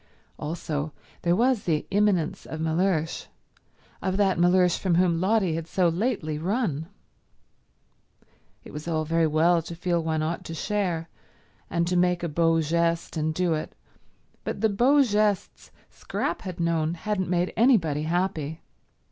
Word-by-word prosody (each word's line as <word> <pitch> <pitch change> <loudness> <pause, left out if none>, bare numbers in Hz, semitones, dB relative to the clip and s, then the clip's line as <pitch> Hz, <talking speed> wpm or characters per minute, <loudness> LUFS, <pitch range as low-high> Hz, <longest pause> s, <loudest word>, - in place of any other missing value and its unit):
Also, 150 -1 -3 0.3
there 175 0 +2
was 245 +1 +2
the 155 -3 0
imminence 195 -5 +1
of 160 - -6
Mellersh, 160 0 0 0.7
of 190 0 -1
that 195 -4 +2
Mellersh 180 0 +4
from 185 -3 +1
whom 175 -1 +2
Lotty 195 -3 +2
had 165 0 -4
so 175 +1 +2
lately 165 -5 -1
run. 170 - -1 1.8
It - - -12
was 150 +2 -7
all 155 -2 0
very 165 +1 +2
well 165 +3 +3
to 170 +1 -8
feel 175 -1 0
one 160 -1 -1
ought 165 +2 -2
to 165 - -6
share, 180 -3 -1 0.6
and 170 0 0
to 180 +1 -1
make 180 0 +2
a 170 - -1
beau 165 +1 +2
geste 170 +2 0
and 155 0 0
do 175 +1 0
it, 155 - -4 0.7
but - - -4
the 220 - +3
beaux 260 +8 +4
gestes 210 -4 0 0.2
Scrap - - -3
had 180 -3 -7
known 165 -1 0
hadn't 190 0 -2
made 180 0 0
anybody 185 - +3
happy. 160 -2 -2
170 Hz, 150 wpm, -26 LUFS, 160-190 Hz, 1.8 s, Mellersh